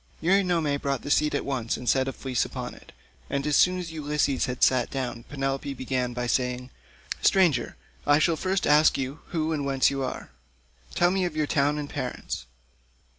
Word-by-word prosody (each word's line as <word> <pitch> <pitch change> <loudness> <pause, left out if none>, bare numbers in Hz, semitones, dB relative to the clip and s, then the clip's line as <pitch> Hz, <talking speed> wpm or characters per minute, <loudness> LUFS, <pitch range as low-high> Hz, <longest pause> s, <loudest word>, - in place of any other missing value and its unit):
Eurynome 170 -5 +2
brought 140 -2 -1
the 145 - -3
seat 150 0 +3
at - - -1
once 125 -5 -2
and 125 - -8
set 130 +1 +3
a - - -1
fleece 130 -2 -1
upon - - -6
it, - - -16 0.4
and 140 0 -1
as 150 -1 +2
soon 185 +4 +4
as 175 -3 -5
Ulysses 150 -3 0
had 125 0 -2
sat 130 -2 +4
down 125 -3 -4
Penelope 135 0 -2
began 125 -1 -2
by 125 0 -3
saying, 125 +1 -1 0.5
"Stranger, 170 -11 +3 0.3
I 145 0 +6
shall 165 +2 +3
first 185 +3 -1
ask 150 +1 +5
you 135 +3 -4
who 160 -1 -1
and 145 -2 -2
whence 135 -1 +2
are - - -3
you? 135 -2 -4 0.7
Tell 175 0 +4
me 190 0 +1
of 170 -3 -4
your 155 -1 +1
town 145 0 +1
and 150 -1 -4
parents." - - -5
140 Hz, 190 wpm, -26 LUFS, 130-155 Hz, 0.7 s, I